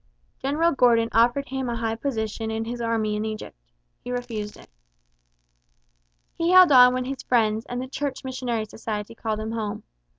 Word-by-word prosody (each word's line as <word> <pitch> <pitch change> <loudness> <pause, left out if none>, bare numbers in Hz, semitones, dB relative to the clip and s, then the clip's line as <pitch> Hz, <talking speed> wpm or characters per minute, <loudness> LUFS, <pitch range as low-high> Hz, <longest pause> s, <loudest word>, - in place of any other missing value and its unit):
General 305 +5 +1
Gordon 235 -4 +3
offered 245 +5 +2
him 265 -1 -3
a 235 - -2
high 225 -1 -1
position 225 -2 -3
in 220 0 -2
his 240 +1 -5
army 225 -2 0
in 210 - -2
Egypt. 215 - -6 0.5
He - - -7
refused 230 -4 -4
it. - - -16 1.7
He 335 +1 -1
held 365 -3 +8
on 250 -1 +8
when 255 0 -2
his 270 +1 -5
friends 220 -2 +1
and 245 - -4
the 260 - -4
Church 280 0 -4
Missionary 250 -4 -3
Society 210 0 -5
called 220 -1 -3
him 220 +1 -4
home. 215 -2 -4
235 Hz, 170 wpm, -24 LUFS, 220-260 Hz, 1.7 s, held